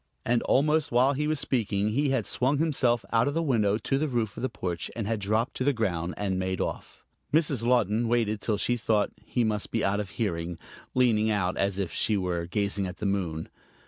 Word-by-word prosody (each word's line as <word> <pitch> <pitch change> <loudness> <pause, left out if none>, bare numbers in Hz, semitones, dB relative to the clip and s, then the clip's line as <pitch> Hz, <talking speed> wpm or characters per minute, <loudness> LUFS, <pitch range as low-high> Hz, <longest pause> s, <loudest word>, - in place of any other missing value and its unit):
And 120 0 +2
almost 150 +2 +2
while 125 +3 +4
he 150 +2 -1
was 155 -1 0
speaking 105 -5 0
he 140 +6 +1
had 130 -6 +1
swung 135 +3 +1
himself 135 -7 +1
out 115 +2 +4
of 145 - -1
the 165 - +1
window 110 -8 +2
to 135 +4 -1
the 155 - 0
roof 115 -6 -1
of - - -6
the 130 - 0
porch 85 -2 -4
and 115 -3 -3
had 110 0 -1
dropped 110 +5 0
to - - -1
the 145 +2 +3
ground 90 -7 -1
and 95 -2 -1
made 95 0 -2
off. - - -5 0.3
Mrs. 145 -6 +2
Laughton 115 -2 +2
waited 110 -3 +1
till 105 -3 0
she 120 +4 +1
thought 110 -3 +1
he 120 - 0
must 105 -2 -1
be 115 - 0
out 100 +1 +1
of 105 -2 -4
hearing, 85 -4 -3 0.4
leaning 115 -4 +3
out 95 -4 0
as 100 -1 0
if 95 -4 -2
she 105 - +1
were 90 -3 -2
gazing 100 +1 -1
at 90 - -7
the 105 - -4
moon. 90 -5 -1
110 Hz, 220 wpm, -27 LUFS, 100-125 Hz, 0.4 s, while